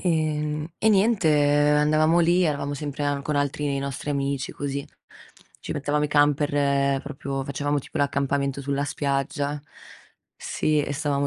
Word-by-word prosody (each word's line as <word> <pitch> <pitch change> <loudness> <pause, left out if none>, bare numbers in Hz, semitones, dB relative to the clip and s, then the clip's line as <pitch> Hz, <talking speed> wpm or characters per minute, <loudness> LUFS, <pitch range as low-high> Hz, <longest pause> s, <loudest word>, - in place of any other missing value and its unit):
Ehm, 155 -2 -1
e 220 - +3
niente, 205 -3 +3 0.5
andavamo 155 +3 +3
lì, 175 +2 +3
eravamo 145 -2 -1
sempre 145 0 -4
a 145 -1 0
con 150 +1 -3
altri 145 +1 -1
dei 140 -1 -1
nostri 140 +1 -4
amici 140 -1 -2
così. 140 0 -4 0.7
Ci - - -5
mettevamo 145 +1 0
i - - -1
camper 145 -1 +2
proprio 140 -1 -4
facevamo 145 +2 -1
tipo - - -7
l'accampamento 140 -1 0
sulla 140 +1 -1
spiaggia. 140 +1 -2 0.8
Sì, 155 -1 0
e 140 - -3
stavamo 140 -1 0
145 Hz, 145 wpm, -24 LUFS, 140-150 Hz, 0.8 s, e